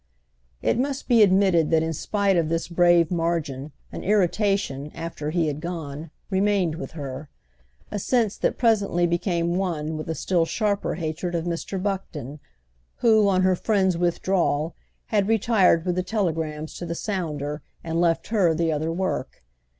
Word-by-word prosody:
It - - +2
must 270 +1 -2
be 235 -3 +5
admitted 190 -5 +4
that 160 -1 +3
in 160 0 -1
spite 200 +4 0
of 165 -2 +1
this 165 0 -1
brave 175 -1 +4
margin 165 -5 -2 0.2
an - - -6
irritation, 195 -7 +1
after 165 -2 -5
he 170 +1 +1
had 150 0 -3
gone, 160 -3 -5 0.2
remained 195 -3 +2
with 165 - -7
her; 140 -1 -6 0.6
a 210 - -2
sense 225 -1 +1
that - - 0
presently 205 -7 +2
became 170 0 0
one 160 -5 -2
with 155 - -6
a 160 - -1
still 175 +3 +1
sharper 200 +5 -1
hatred 170 +2 -3
of 165 0 -1
Mr. 175 +3 -3
Buckton, 165 -8 -4 0.6
who, 220 -3 +4
on 185 -1 +2
her 185 0 +4
friend's 190 -2 +1
withdrawal, 175 -2 0 0.4
had 200 -2 +3
retired 210 -6 +3
with 180 - +1
the 185 - 0
telegrams 160 -6 -2
to 175 - -5
the 170 - -3
sounder 155 -7 -3 0.2
and 165 +1 -1
left 170 -1 +1
her 190 -8 +3
the 165 0 +1
other 155 +2 -1
work. 185 - -3
175 Hz, 160 wpm, -24 LUFS, 160-195 Hz, 0.6 s, be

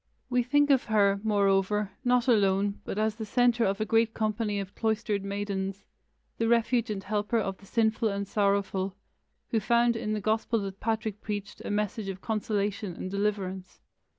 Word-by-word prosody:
We 250 0 +3
think 290 +4 +3
of 265 -2 +3
her, 200 -2 +3
moreover, 200 -1 +2
not 245 -1 +2
alone, 200 -3 +2
but - - -4
as 215 0 +1
the 225 - -4
centre 240 +2 +2
of 195 +1 0
a 215 - 0
great 225 +1 +2
company 215 -1 -1
of 195 -1 -6
cloistered 215 -2 -1
maidens, 200 -1 -3 0.6
the 230 - +2
refuge 235 0 +2
and 200 -2 -3
helper 210 +3 0
of 195 -3 -2
the 195 - -16
sinful 220 0 +1
and 200 0 -3
sorrowful, 200 -2 0 0.6
who 225 - +2
found 235 +2 +3
in 215 -1 -2
the 215 - -1
gospel 220 +2 0
that 195 -1 -6
Patrick 220 -2 -2
preached 205 -2 -5
a - - -5
message 210 0 -1
of 190 -1 -5
consolation 205 -3 -2
and 185 - -6
deliverance. 195 -2 -2
210 Hz, 175 wpm, -28 LUFS, 200-225 Hz, 0.6 s, We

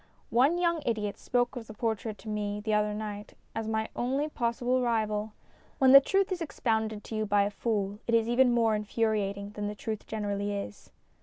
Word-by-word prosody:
One 270 +8 +4
young 340 -2 +1
idiot 210 -4 -2
spoke 245 +1 0
of 235 -3 -7
the 215 - -10
portrait 220 -1 -2
to - - -14
me 210 -1 -2
the 215 +1 -2
other 210 0 +1
night 210 -1 -6 0.2
as 225 -1 -3
my 220 0 -1
only 270 +5 0
possible 245 -1 0
rival. 215 -3 0 0.4
When 265 -1 +5
the 275 +1 +11
truth 390 +6 +1
is 360 -2 -2
ex 325 - -6
pounded 220 -2 0
to 225 - -6
you 215 0 -1
by 205 0 +4
a 200 - -1
fool 205 -2 -2
it 230 - +3
is 225 0 +3
even 245 +1 +4
more 230 -2 +3
infuriating 210 -2 -1
than 210 0 -4
the 210 - -4
truth 215 0 -5
generally 205 -1 -2
is. 105 - -7
220 Hz, 205 wpm, -29 LUFS, 210-240 Hz, 0.4 s, the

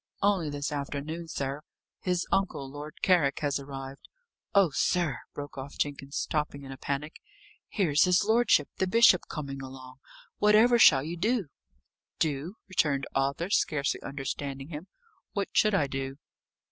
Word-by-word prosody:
"Only 195 -6 +2
this 145 +1 -3
afternoon, 150 +3 -4
sir. 140 -2 -3 0.4
His 180 -1 -1
uncle, 195 -8 0
Lord 145 +2 -9
Carrick, 170 -7 +3
has 145 -1 0
arrived. 135 -1 -8 0.5
Oh, 195 -5 +5
sir!" 175 -6 +1 0.2
broke 145 -1 -7
off 140 +2 -8
Jenkins, 140 0 -3
stopping 150 -2 -2
in 135 - -8
a 135 - -8
panic, 145 +4 -4 0.5
"here's 165 -8 +3
his 180 +2 +3
lordship 220 -8 +3
the 190 - +1
bishop 210 -2 +5
coming 140 -3 -5
along! 130 -1 -10 0.4
Whatever 220 +3 +5
shall 135 -10 +7
you 165 +3 -5
do?" 210 - 0 0.7
"Do!" 155 +5 -1
returned 145 -7 +1
Arthur, 140 +7 -1
scarcely 140 -8 +1
understanding 140 0 -5
him. 160 +3 -7 0.5
"What 200 -3 -2
should 215 -2 +4
I 155 - +3
do?" 135 0 -4
150 Hz, 145 wpm, -28 LUFS, 140-180 Hz, 0.7 s, shall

